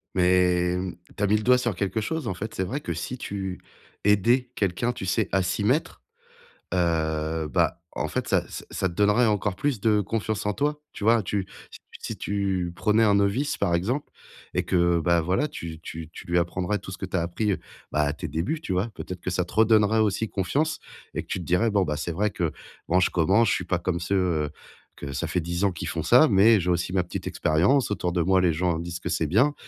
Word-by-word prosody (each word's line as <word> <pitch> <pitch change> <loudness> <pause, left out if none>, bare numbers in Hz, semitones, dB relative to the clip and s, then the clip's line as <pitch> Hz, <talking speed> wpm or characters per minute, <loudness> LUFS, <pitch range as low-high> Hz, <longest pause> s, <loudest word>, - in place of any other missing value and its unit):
Mais 90 -1 +3
mmh, 90 -1 -4 0.2
tu 105 - -2
as - - +4
mis 105 - +3
le 105 - -4
doigt 125 0 +5
sur 120 -5 -1
quelque 100 +3 -1
chose, 160 +4 -3
en - - -1
fait, 105 +4 -6
c'est 95 - -1
vrai 130 +10 -3
que 85 - -4
si 125 +10 -5
tu 95 -4 -5 0.5
aidais 120 +5 +3
quelqu'un, 100 +5 0
tu 95 - -6
sais, 90 - +1
à 95 - +4
s'y 90 +3 -1
mettre, 135 +9 0 0.7
heu, 80 -2 0
bah 85 - +1 0.2
en - - 0
fait, - - -3
ça - - +2
ç - - -7
ça 95 - 0
te 85 - -9
donnerait 105 +5 +3
encore 105 -3 0
plus 135 -6 -1
de 105 -1 +3
confiance 105 0 -2
en 105 - +1
toi, 150 +3 -1
tu - - -8
vois? 115 0 +5
Tu 95 0 -2 0.2
si - - -12
tu - - -15
si - - -5
tu 95 -3 -1
prenais 105 +4 +3
un 105 -2 +4
novice, 100 +9 +1
par 90 -4 +1
exemple, 120 +12 -1 0.4
et - - +1
que, 85 -1 +2
bah 85 0 +3
voilà, 90 - +1
tu 80 -2 -7
tu 80 -2 -7
tu - - -10
lui 85 0 +1
apprendrais 90 +3 0
tout 95 - -9
ce 90 - -7
que 95 - -4
tu 95 - -2
as - - +1
appris, 100 +5 -1
heu, - - -4 0.3
bah 75 - +1
à 75 - 0
tes - - -6
débuts, 125 - -2
tu 100 - -5
vois? 90 +5 +1
Peut-être 90 -1 -6
que 90 - -4
ça 90 - 0
te 90 - -12
redonnerait 110 0 +4
aussi 110 +1 +1
confiance, 135 - -1 0.4
et - - -2
que - - -26
tu - - -3
te 90 - -6
dirais: 90 +7 +2
«Bon, 100 -2 +3
bah 75 -3 -2
c'est 85 +3 -3
vrai 105 +5 +1
que 85 -5 -2 0.3
bon, 90 +2 +3
je - - +3
commence, 100 +6 +3
je - - +3
suis 90 - -3
pas 90 0 0
comme 85 -1 -1
ceux, 95 +3 -1
heu, 85 -6 +1 0.5
que 70 -1 -7
ça 70 +6 -2
fait 85 +3 -1
10 85 +3 -3
ans 100 - +3
qu'ils 85 - -6
font - - -3
ça, - - +6
mais 105 +2 +6
j'ai 90 +1 -1
aussi 85 0 -1
ma 95 -2 +2
petite 90 - -6
expérience. 100 - +2
Autour 90 -3 -1
de 85 -1 0
moi, 95 +2 +3
les 85 -3 +3
gens 85 0 0
disent 85 0 -5
que 85 - -4
c'est 80 - 0
bien 125 - +3
95 Hz, 245 wpm, -25 LUFS, 85-105 Hz, 0.7 s, ça